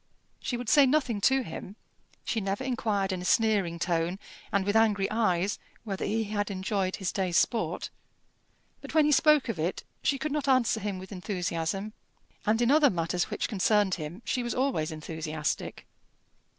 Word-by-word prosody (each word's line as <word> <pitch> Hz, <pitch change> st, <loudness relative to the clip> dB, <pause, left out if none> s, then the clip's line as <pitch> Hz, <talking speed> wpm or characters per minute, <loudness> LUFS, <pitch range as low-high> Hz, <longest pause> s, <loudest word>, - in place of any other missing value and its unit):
She 245 Hz, -, -3 dB
would 245 Hz, -1 st, -6 dB
say 275 Hz, +4 st, +6 dB
nothing 255 Hz, -7 st, +1 dB
to 265 Hz, +4 st, +3 dB
him. 190 Hz, +1 st, -8 dB, 0.5 s
She 225 Hz, -, -1 dB
never 195 Hz, +5 st, -2 dB
inquired 215 Hz, -6 st, 0 dB
in 185 Hz, -1 st, -3 dB
a -, -, -6 dB
sneering 205 Hz, -5 st, +2 dB
tone, 170 Hz, +1 st, 0 dB, 0.3 s
and 200 Hz, -1 st, +1 dB
with 205 Hz, +1 st, 0 dB
angry 210 Hz, -3 st, +3 dB
eyes, 200 Hz, -4 st, +1 dB, 0.2 s
whether 200 Hz, -4 st, -4 dB
he 225 Hz, +1 st, 0 dB
had 205 Hz, 0 st, -2 dB
enjoyed 190 Hz, -1 st, -1 dB
his 190 Hz, -, -2 dB
day's 185 Hz, -3 st, 0 dB
sport; 230 Hz, -3 st, 0 dB, 0.9 s
but -, -, -9 dB
when 310 Hz, -2 st, +6 dB
he 300 Hz, -, +3 dB
spoke 300 Hz, 0 st, +5 dB
of 220 Hz, -8 st, -3 dB
it, 170 Hz, +4 st, -2 dB, 0.2 s
she 275 Hz, -, +1 dB
could 300 Hz, +3 st, -3 dB
not 295 Hz, -1 st, -1 dB
answer 255 Hz, -4 st, +3 dB
him 205 Hz, -2 st, -3 dB
with 185 Hz, +2 st, -10 dB
enthusiasm; 185 Hz, +1 st, -3 dB, 0.5 s
and 225 Hz, +3 st, +3 dB
in 240 Hz, -, +3 dB
other 295 Hz, -1 st, +6 dB
matters 175 Hz, -1 st, -1 dB
which -, -, -2 dB
concerned 205 Hz, -2 st, +2 dB
him 170 Hz, +6 st, -5 dB
she 250 Hz, -, 0 dB
was 240 Hz, 0 st, -3 dB
always 255 Hz, -, 0 dB
enthusiastic. 155 Hz, -1 st, -4 dB
205 Hz, 175 wpm, -28 LUFS, 180-240 Hz, 0.9 s, say